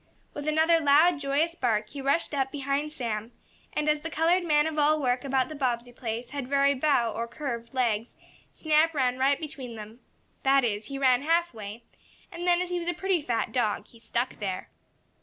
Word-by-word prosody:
With 290 +1 -6
another 320 +2 +4
loud, 310 +2 +5
joyous 290 +4 0
bark 220 -9 0
he 280 +3 -7
rushed 280 +4 0
up 270 -2 0
behind 280 +1 -2
Sam, 230 -5 -4 0.4
and, 300 - -2
as 300 0 +3
the 325 - -6
colored 335 +3 +2
man 300 -3 +3
of 315 -1 -2
all 305 +1 +4
work 250 -2 0
about 265 -2 +1
the 310 - -7
Bobbsey 245 -4 -2
place 235 0 -5
had 280 -3 -4
very 280 +1 +3
bow, 260 -4 +2
or 230 +1 -3
curved, 235 -3 -5
legs, 235 -4 -1 0.4
Snap 315 +1 +2
ran 255 -2 +1
right 275 +1 +3
between 265 -6 -7
them. 215 +2 -10 0.4
That 275 0 +4
is, 210 -2 -1
he 275 - -5
ran 260 -2 +3
half 335 +2 +1
way, 215 +1 -8 0.5
and 345 +1 -5
then, 355 0 +4
as 360 - -7
he 355 - 0
was 340 - -6
a 350 - 0
pretty 380 -1 0
fat 240 -5 -1
dog, 215 -4 0
he 230 - -17
stuck 240 +2 -2
there. 190 -3 -4
275 Hz, 200 wpm, -27 LUFS, 240-310 Hz, 0.5 s, loud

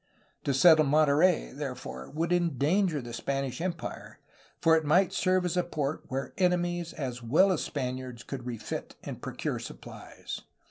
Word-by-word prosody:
To 140 - +2
settle 155 +2 +7
Monterey, 150 - +3
therefore, 65 0 -6
would 165 +3 -1
endanger 170 -1 +1
the 120 -1 -8
Spanish 135 +3 -2
empire, 175 -2 -5 0.4
for 160 0 +5
it 160 - +2
might 175 +5 +3
serve 185 -1 +2
as 180 0 -1
a 180 - +3
port 155 -4 -3
where 135 -1 -4
enemies 175 -2 +1
as 125 -4 -4
well 155 +12 +4
as 175 - 0
Spaniards 130 -3 -4
could 130 -3 -6
refit 115 -3 -5
and - - -7
procure - - -3
supplies. - - -8
155 Hz, 150 wpm, -29 LUFS, 130-175 Hz, 0.4 s, settle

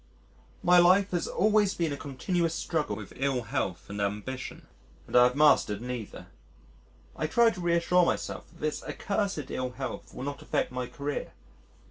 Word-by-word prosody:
My 180 0 +6
life 185 +3 +5
has 175 -2 -1
always 210 0 +2
been 165 -4 0
a - - -2
continuous 165 +5 -1
struggle 150 -13 -1
with 100 -1 -9
ill 135 -2 0
health 90 -5 -3
and 105 0 -5
ambition, 105 +6 -4 0.4
and - - -7
I 125 0 +8
have 125 +1 +1
mastered 145 -8 +4
neither. 120 -2 -6 0.9
I 155 - -1
try 235 +5 +4
to 185 - -7
reassure 175 +1 +3
myself - - -2
that 170 - -19
this 155 0 -2
accursed 200 -8 -2
ill 125 -1 -3
health 130 0 -6
will 125 - -7
not 140 +1 -5
affect - - -1
my 125 -1 -3
career. 145 +2 -4
145 Hz, 165 wpm, -28 LUFS, 125-175 Hz, 0.9 s, I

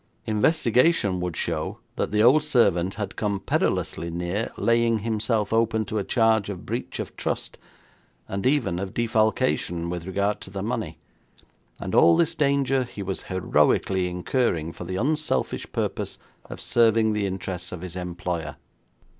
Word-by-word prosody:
Investigation 115 - +2
would 90 -2 -3
show 80 -2 -2 0.2
that - - -1
the 105 +1 +2
old 135 +6 +6
servant 95 - +2
had 100 -3 -4
come 100 -2 -1
perilously 85 -2 -1
near 90 +6 -2
laying 115 -1 +3
himself 110 -1 0
open 110 -1 +2
to 105 +1 -2
a - - -1
charge 110 -3 +2
of 95 -3 -6
breach - - -4
of - - -5
trust, - - -3 0.7
and 100 +5 -1
even 120 -11 +1
of 95 0 -5
defalcation 110 -7 +1
with 90 0 -5
regard 100 +2 0
to - - -7
the 95 0 -5
money, 100 -8 -3 0.8
and - - -5
all 85 0 +6
this 165 0 +2
danger 140 -3 +2
he 105 -4 -7
was 95 0 -3
heroically 95 0 +2
incurring 90 - -1
for 90 - -8
the 95 +2 -4
unselfish 150 +9 -1
purpose - - -3 0.3
of - - -9
serving 115 -2 +3
the 105 -1 0
interests 95 -2 -5
of 90 - -6
his 90 -1 -7
employer. 90 -2 -4
100 Hz, 155 wpm, -25 LUFS, 90-115 Hz, 0.8 s, old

